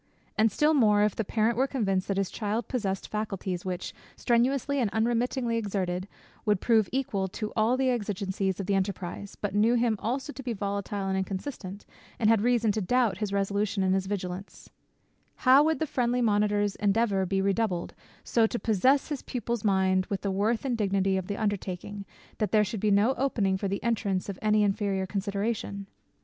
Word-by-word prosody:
And 220 Hz, 0 st, +3 dB
still 300 Hz, +8 st, +3 dB
more, 210 Hz, -7 st, +4 dB
if 210 Hz, -2 st, +1 dB
the 225 Hz, -, -1 dB
parent 220 Hz, +2 st, +1 dB
were 265 Hz, -, +3 dB
convinced 195 Hz, -9 st, -1 dB
that 195 Hz, -, -1 dB
his 195 Hz, -2 st, 0 dB
child 220 Hz, +1 st, -2 dB
possessed 195 Hz, -6 st, -2 dB
faculties 195 Hz, -4 st, -3 dB
which, 185 Hz, -1 st, -4 dB, 0.2 s
strenuously 265 Hz, +3 st, +1 dB
and 235 Hz, -5 st, +1 dB
unremittingly 235 Hz, +2 st, 0 dB
exerted, 190 Hz, -4 st, -2 dB, 0.4 s
would 210 Hz, -3 st, +2 dB
prove 220 Hz, -2 st, +3 dB
equal 215 Hz, -8 st, -1 dB
to 210 Hz, +3 st, -5 dB
all 225 Hz, +3 st, +2 dB
the 265 Hz, 0 st, +2 dB
exigences 195 Hz, -4 st, -2 dB
of 195 Hz, -, -3 dB
the 200 Hz, -, 0 dB
enterprize, 195 Hz, 0 st, -3 dB
but 205 Hz, -2 st, -4 dB
knew 220 Hz, +4 st, +3 dB
him 235 Hz, -2 st, +2 dB
also 265 Hz, +5 st, -3 dB
to 270 Hz, -, -8 dB
be 250 Hz, -3 st, -3 dB
volatile 200 Hz, -1 st, -3 dB
and 190 Hz, 0 st, 0 dB
inconstant, 195 Hz, 0 st, -5 dB, 0.3 s
and 220 Hz, -2 st, +3 dB
had 225 Hz, -3 st, +3 dB
reason 235 Hz, -2 st, +2 dB
to 215 Hz, +1 st, -2 dB
doubt 225 Hz, 0 st, +1 dB
his 210 Hz, -3 st, -2 dB
resolution 200 Hz, 0 st, 0 dB
and 185 Hz, 0 st, +2 dB
his 190 Hz, 0 st, 0 dB
vigilance; 190 Hz, -1 st, -5 dB, 0.6 s
how 265 Hz, +1 st, +6 dB
would 320 Hz, +1 st, +2 dB
the 320 Hz, -, -1 dB
friendly 245 Hz, -3 st, 0 dB
monitor's 205 Hz, -2 st, +2 dB
endeavour 200 Hz, -2 st, +1 dB
be 195 Hz, +1 st, 0 dB
redoubled, 195 Hz, -2 st, 0 dB, 0.3 s
so 230 Hz, -2 st, +3 dB
to 240 Hz, -, -3 dB
possess 255 Hz, -, +2 dB
his 290 Hz, -4 st, -3 dB
pupil's 235 Hz, -3 st, -3 dB
mind 190 Hz, -2 st, +2 dB
with 200 Hz, -, -3 dB
the 200 Hz, -, -1 dB
worth 215 Hz, +6 st, 0 dB
and 245 Hz, -4 st, -1 dB
dignity 195 Hz, -1 st, +1 dB
of 190 Hz, -1 st, -2 dB
the 205 Hz, -, -3 dB
undertaking, 200 Hz, -1 st, -3 dB, 0.3 s
that 215 Hz, -, 0 dB
there 215 Hz, -1 st, +5 dB
should 210 Hz, +1 st, -4 dB
be 215 Hz, -, +1 dB
no 205 Hz, +6 st, +4 dB
opening 215 Hz, -8 st, +1 dB
for 195 Hz, +1 st, -2 dB
the 200 Hz, +1 st, -3 dB
entrance 205 Hz, -5 st, -1 dB
of 195 Hz, -, -6 dB
any 215 Hz, 0 st, +3 dB
inferior 195 Hz, -1 st, 0 dB
consideration! 200 Hz, +1 st, -3 dB
205 Hz, 190 wpm, -28 LUFS, 195-235 Hz, 0.6 s, how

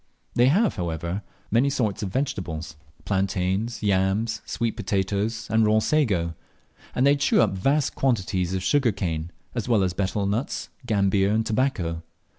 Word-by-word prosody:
They 120 Hz, +1 st, +4 dB
have, 200 Hz, -, +3 dB
however, 85 Hz, +2 st, -3 dB, 0.3 s
many 120 Hz, +6 st, +3 dB
sorts 115 Hz, -8 st, -1 dB
of 100 Hz, -, -2 dB
vegetables, 90 Hz, -, -3 dB, 0.3 s
plantains, 100 Hz, +3 st, -1 dB
yams, 100 Hz, +3 st, +1 dB
sweet 115 Hz, -1 st, -1 dB
potatoes, 105 Hz, +2 st, -1 dB
and 110 Hz, 0 st, +4 dB
raw 110 Hz, 0 st, +4 dB
sago; 105 Hz, -, +1 dB, 0.6 s
and 125 Hz, -, +3 dB
they 140 Hz, +1 st, +6 dB
chew 145 Hz, 0 st, +2 dB
up 110 Hz, -, +4 dB
vast 135 Hz, +10 st, +1 dB
quantities 95 Hz, -7 st, 0 dB
of 95 Hz, -, -2 dB
sugar 130 Hz, +4 st, +3 dB
cane, 85 Hz, -4 st, -3 dB, 0.2 s
as 120 Hz, -1 st, -3 dB
well 110 Hz, -5 st, +4 dB
as 90 Hz, -2 st, 0 dB
betel 100 Hz, +2 st, -1 dB
nuts, 105 Hz, +7 st, -2 dB, 0.2 s
gambir, 100 Hz, -2 st, +2 dB
and 110 Hz, +2 st, +1 dB
tobacco. 105 Hz, -9 st, 0 dB
105 Hz, 150 wpm, -25 LUFS, 95-120 Hz, 0.6 s, they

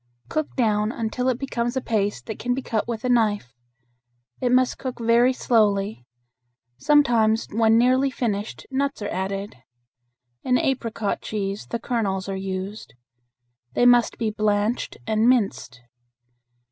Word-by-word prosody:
Cook 310 Hz, -1 st, -2 dB
down 215 Hz, -3 st, +1 dB
until 240 Hz, +2 st, -2 dB
it 250 Hz, -, 0 dB
becomes 240 Hz, -2 st, -2 dB
a -, -, +3 dB
paste 210 Hz, -4 st, -1 dB
that 220 Hz, -, -6 dB
can 245 Hz, +1 st, -1 dB
be 265 Hz, -, -4 dB
cut 220 Hz, -2 st, -2 dB
with 235 Hz, 0 st, -4 dB
a -, -, +1 dB
knife. 210 Hz, -, +1 dB, 0.9 s
It 245 Hz, -, +1 dB
must 255 Hz, 0 st, +2 dB
cook 260 Hz, -2 st, -5 dB
very 235 Hz, +2 st, +4 dB
slowly. 205 Hz, -, +1 dB, 0.7 s
Sometimes 235 Hz, -7 st, +3 dB
when 225 Hz, +1 st, +4 dB
nearly 255 Hz, +3 st, +3 dB
finished 220 Hz, -5 st, -3 dB
nuts 275 Hz, -3 st, -1 dB
are 205 Hz, -, -3 dB
added. 195 Hz, -2 st, -4 dB, 0.9 s
In 250 Hz, -1 st, +2 dB
apricot 230 Hz, -6 st, -1 dB
cheese 200 Hz, -1 st, -4 dB
the 235 Hz, -, -2 dB
kernels 205 Hz, -5 st, -2 dB
are 195 Hz, -, -3 dB
used. 190 Hz, -, -5 dB, 0.8 s
They 245 Hz, -, +3 dB
must 245 Hz, -1 st, +4 dB
be 225 Hz, -2 st, -1 dB
blanched 210 Hz, +2 st, 0 dB
and 220 Hz, +2 st, +2 dB
minced. 200 Hz, -, 0 dB
225 Hz, 140 wpm, -23 LUFS, 205-245 Hz, 0.9 s, very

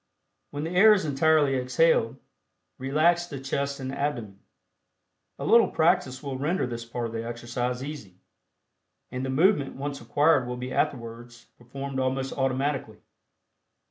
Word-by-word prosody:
When 145 Hz, +1 st, -5 dB
the 165 Hz, -, -3 dB
air 205 Hz, +4 st, +7 dB
is 195 Hz, -5 st, 0 dB
entirely 145 Hz, -1 st, +3 dB
exhaled, 125 Hz, -1 st, +2 dB, 0.6 s
relax 160 Hz, +6 st, +2 dB
the 140 Hz, -5 st, -7 dB
chest 140 Hz, +1 st, -3 dB
and 130 Hz, 0 st, -4 dB
abdomen. 120 Hz, -9 st, -3 dB, 1.0 s
A -, -, -5 dB
little 235 Hz, 0 st, +6 dB
practice 160 Hz, -6 st, +1 dB
will 135 Hz, -2 st, -4 dB
render 160 Hz, +7 st, 0 dB
this 120 Hz, -1 st, -5 dB
part 120 Hz, +1 st, -4 dB
of 115 Hz, -, -5 dB
the 115 Hz, 0 st, -3 dB
exercise 120 Hz, +2 st, -3 dB
easy, 140 Hz, -11 st, -8 dB, 1.0 s
and 125 Hz, +1 st, -4 dB
the 135 Hz, -, -3 dB
movement 145 Hz, +1 st, +2 dB
once 140 Hz, +1 st, -5 dB
acquired 145 Hz, -4 st, +2 dB
will 125 Hz, 0 st, -4 dB
be 125 Hz, +1 st, -5 dB
afterwards 120 Hz, -1 st, -3 dB
performed 135 Hz, +2 st, -6 dB
almost 130 Hz, +1 st, -1 dB
automatically. 135 Hz, -3 st, -1 dB
135 Hz, 140 wpm, -26 LUFS, 125-150 Hz, 1.0 s, air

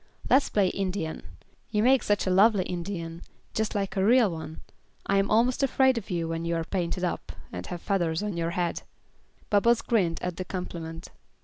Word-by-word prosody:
"Let's 270 Hz, +2 st, +5 dB
play 200 Hz, -3 st, +2 dB
Indian. 185 Hz, -5 st, -3 dB, 0.5 s
You 210 Hz, -1 st, +1 dB
make 260 Hz, +2 st, +5 dB
such 205 Hz, 0 st, +1 dB
a 185 Hz, -, +1 dB
lovely 200 Hz, +1 st, +5 dB
Indian, 170 Hz, -2 st, -5 dB, 0.3 s
just 220 Hz, -1 st, -1 dB
like 195 Hz, -1 st, -2 dB
a 190 Hz, -, +1 dB
real 230 Hz, -1 st, +5 dB
one. 160 Hz, -1 st, -7 dB, 0.4 s
I 200 Hz, -, +2 dB
am 195 Hz, -, +1 dB
almost 240 Hz, +5 st, +3 dB
afraid 265 Hz, -1 st, +3 dB
of 230 Hz, -3 st, -5 dB
you 170 Hz, -3 st, -1 dB
when 165 Hz, 0 st, -3 dB
you 170 Hz, 0 st, -1 dB
are 165 Hz, -, -1 dB
painted 180 Hz, 0 st, -2 dB
up, 180 Hz, -, -2 dB, 0.2 s
and 90 Hz, 0 st, -6 dB
have 175 Hz, -1 st, -6 dB
feathers 175 Hz, -3 st, 0 dB
in 210 Hz, -3 st, -3 dB
your 165 Hz, 0 st, -1 dB
head." 175 Hz, -1 st, -1 dB, 0.7 s
Bubbles 230 Hz, +3 st, +4 dB
grinned 180 Hz, -8 st, +1 dB
at 180 Hz, -1 st, -3 dB
the 185 Hz, -, -2 dB
compliment. 170 Hz, -3 st, -6 dB
185 Hz, 190 wpm, -27 LUFS, 170-210 Hz, 0.7 s, Let's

